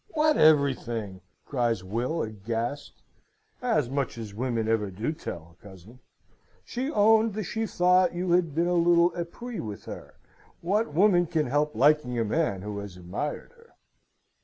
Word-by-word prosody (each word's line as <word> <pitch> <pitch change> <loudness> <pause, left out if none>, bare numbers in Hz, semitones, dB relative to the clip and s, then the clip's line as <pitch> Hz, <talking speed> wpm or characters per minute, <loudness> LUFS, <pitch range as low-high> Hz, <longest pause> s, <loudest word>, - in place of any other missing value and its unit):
"What 305 0 +3
everything?" 120 -10 +2 0.2
cries 120 -7 -1
Will, 120 - -2
aghast. 115 +6 -5 0.6
"As 225 - +1
much 135 -1 -2
as 110 -3 -7
women 115 0 -2
ever 110 -3 +1
do 105 +10 -3
tell, 85 - -8
cousin. 100 +5 -14 0.7
She 260 +3 -3
owned 220 -2 +4
that 215 - -2
she 225 +3 -3
thought 180 -1 +3
you 180 0 -1
had 170 -4 +2
been 170 +1 +2
a 175 - +1
little 170 0 +4
epris 205 +8 -5
with 105 -2 -7
her. - - -9 0.5
What 205 +5 0
woman 180 -1 +4
can 155 -1 0
help 145 +4 0
liking 140 0 +3
a 115 - +1
man 105 - -1
who 105 -1 -5
has 100 -3 -8
admired 95 - -5
her?" 465 0 -23
145 Hz, 155 wpm, -27 LUFS, 110-180 Hz, 0.7 s, owned